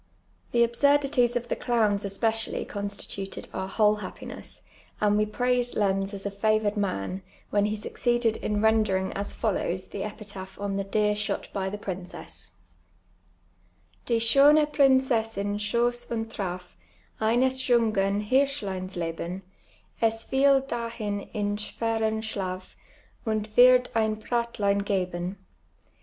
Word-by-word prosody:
The 235 0 +4
absiirdities 275 -1 +3
of 240 0 -1
the - - -1
clowns 215 -5 +1
especially 220 +3 -1
constituted 200 -1 -5
our 190 0 -3
whole 210 +2 +3
haj)piness, 210 - -9 0.4
and 210 -1 +3
we 210 0 +2
])raiscd 245 +2 0
Lenz 195 -1 +1
as 200 -1 -8
a 200 - -1
favoured 215 +1 +1
man, 190 - -2 0.3
when 205 0 +3
he 210 +1 -1
succeeded 240 +1 0
in 210 0 -1
rendering 215 -4 +2
as 200 +1 -4
follow!? 195 -5 -1
the 190 +1 -6
epitaph 200 -2 -7
on 200 -1 -2
the 195 - -1
<leer 210 -1 +2
shot 210 0 -2
by 190 -1 -1
the 205 - -5
princess: 185 -3 -8 0.5
— 90 -1 -38
" 90 0 -37
Die 235 - +2
schtjne 280 +7 +6
Princcssin 230 -7 +2
schoss 240 +3 0
und 225 -1 -2
traf 180 -4 -5 0.5
Eiiies 250 +4 +2
juniren 210 -5 +2
Hirsrhlrins 210 -9 0
Ix 165 -1 -3
lx'ti; 180 +3 -4 0.6
Es 225 0 +1
tiel 270 0 +4
(lahin 230 -4 -3
in 205 -2 -1
schwcrrn 220 +1 -1
Schlaf 185 -4 -4 0.5
Und 215 -2 -1
wird 250 0 +7
I'in 220 -1 +2
Bratltin 215 -3 0
pt'ben. 185 -2 -2
210 Hz, 135 wpm, -27 LUFS, 195-235 Hz, 0.6 s, wird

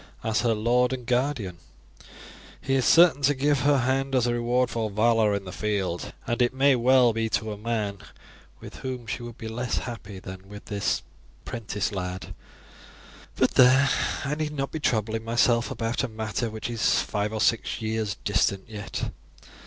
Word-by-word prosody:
As 110 0 +1
her 115 -2 +2
lord 125 +4 +2
and 125 -2 -5
guardian 120 - -1 1.0
he 135 - -2
is 130 -3 +2
certain 165 -4 +6
to 140 +1 +3
give 145 +1 +2
her 145 +2 +3
hand 135 +1 0
as 125 -2 +3
a 120 - +1
reward 120 +1 +1
for 115 -2 -1
valour 110 0 +3
in 100 -1 -4
the 90 - -7
field, 95 -4 -2
and 120 +1 -1
it 125 +1 +2
may 135 0 +4
well 125 -1 +4
be 115 0 -1
to 110 0 -1
a - - -4
man 105 -2 -3 0.6
with - - -10
whom 130 -2 -5
she 110 - -4
would 120 -1 -8
be 110 - -7
less 120 +2 -2
happy 105 -5 -6
than 95 +1 -10
with 105 0 -10
this 100 -2 -1 0.4
'prentice 105 -3 -3
lad; 90 -1 -5 1.0
but - - +2
there, 130 +2 +6 0.4
I 140 - -1
need 150 0 -2
not 135 -1 -3
be 160 - -4
troubling 110 -4 0
myself 120 +1 +2
about 115 -2 -2
a - - 0
matter 110 +1 -3
which 110 0 -5
is 115 -2 +2
five 105 +1 -2
or 110 - -3
six 115 0 +1
years 110 -2 -2
distant 100 -1 +1
yet. 105 -2 -5
115 Hz, 180 wpm, -26 LUFS, 105-130 Hz, 1.0 s, certain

